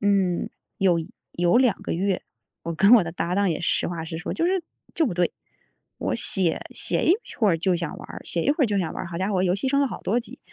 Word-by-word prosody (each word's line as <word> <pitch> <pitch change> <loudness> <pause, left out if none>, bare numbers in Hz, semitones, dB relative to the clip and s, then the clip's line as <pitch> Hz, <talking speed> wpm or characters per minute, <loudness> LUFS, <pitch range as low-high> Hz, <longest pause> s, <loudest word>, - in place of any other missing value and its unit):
嗯， 195 -3 +1 0.3
有 180 -3 +3 0.3
有 175 +4 +2
2 250 -5 +3
个 - - -3
月 190 +2 0 0.4
我 165 0 -4
跟 200 +7 +5
我 215 - +4
的 165 - -4
搭 170 +1 -2
档 200 -1 +2
也 160 - -1
实 175 - 0
话 165 -2 -4
实 160 -1 -5
说， 175 - -4
就 330 - 0
是， 365 0 +1 0.3
就 320 - +2
不 180 - -2
对。 175 -1 +1 0.6
我 - - -2
写， 185 -4 +1
写 - - 0
一 350 - +6 0.2
会 215 -4 +4
儿 165 - +3
就 180 +2 +1
想 165 -3 -3
玩 - - -10
儿， - - -9
写 170 - -1
一 - - +2
会 295 0 +1
儿 - - +2
就 205 -2 0
想 170 -4 -1
玩 - - -5
儿， 170 - -6
好 170 - -6
家 190 +3 -1
伙 185 -1 +1
游 180 -1 +2
戏 205 +7 -2
升 280 +1 +2
了 280 - +2
好 - - -7
多 235 +5 +1
级。 - - -12
185 Hz, 280 characters per minute, -24 LUFS, 170-220 Hz, 0.6 s, 一